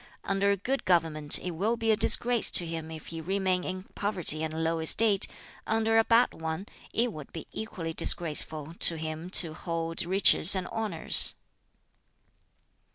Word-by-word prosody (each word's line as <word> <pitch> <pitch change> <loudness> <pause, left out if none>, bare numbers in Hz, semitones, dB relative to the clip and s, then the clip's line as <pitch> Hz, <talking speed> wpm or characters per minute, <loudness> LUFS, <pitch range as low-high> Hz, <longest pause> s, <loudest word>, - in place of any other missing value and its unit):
Under 195 +1 -1
a 200 - 0
good 265 +8 -4
government 160 -4 +3
it 180 - -6
will 205 +8 -2
be 225 -1 -1
a - - +2
disgrace 235 +2 +2
to 175 - +3
him 165 -1 -7
if 160 -1 -10
he 165 - -7
remain 185 +1 -2
in 185 0 -6
poverty 180 -7 -1
and 160 0 -4
low 165 0 -2
estate; 200 +5 +2 0.4
under 225 0 +1
a - - +3
bad 230 +2 +2
one, 160 +3 -6 0.3
it 235 0 -2
would 150 -3 -11
be 165 - -9
equally 170 -7 -7
disgraceful 155 -2 -2
to 170 - +3
him 160 +2 -7
to 170 -4 +7
hold 165 +1 -3
riches 190 0 +6
and 185 - -3
honors. 210 -8 0
180 Hz, 160 wpm, -27 LUFS, 160-205 Hz, 0.4 s, to